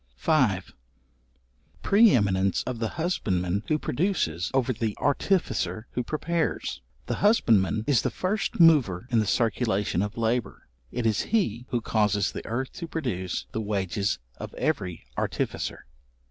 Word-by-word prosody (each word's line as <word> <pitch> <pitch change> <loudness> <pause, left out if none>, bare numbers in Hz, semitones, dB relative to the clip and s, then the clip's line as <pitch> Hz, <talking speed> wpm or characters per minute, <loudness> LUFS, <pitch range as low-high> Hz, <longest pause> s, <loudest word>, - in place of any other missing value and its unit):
§5. 115 - +2 1.1
Pre 220 +3 +6
eminence 100 - +2
of 125 -3 -4
the 115 - 0
husbandman 100 - 0
who 155 - +2
produces, 120 - -1
over 130 -1 +1
the 110 -2 -3
artificer 120 - 0
who 125 - -1
prepares. 155 - -2 0.2
The - - -2
husbandman 110 - +3
is 140 -6 +3
the - - 0
first 195 +2 -2
mover 135 - +5
in 115 - +4
the 105 - 0
circulation 105 -4 +1
of 105 +2 -3
labour: 115 -1 -1 0.2
it 125 -1 -3
is 110 -2 +2
he 125 - 0
who 120 - -1
causes 105 -3 +1
the - - -6
earth 130 +4 -3
to 170 - -5
produce 115 - -3
the 110 - -2
wages 100 - -1 0.2
of - - -8
every 90 -6 -2
artificer. - - -2
115 Hz, 140 wpm, -26 LUFS, 100-150 Hz, 1.1 s, Pre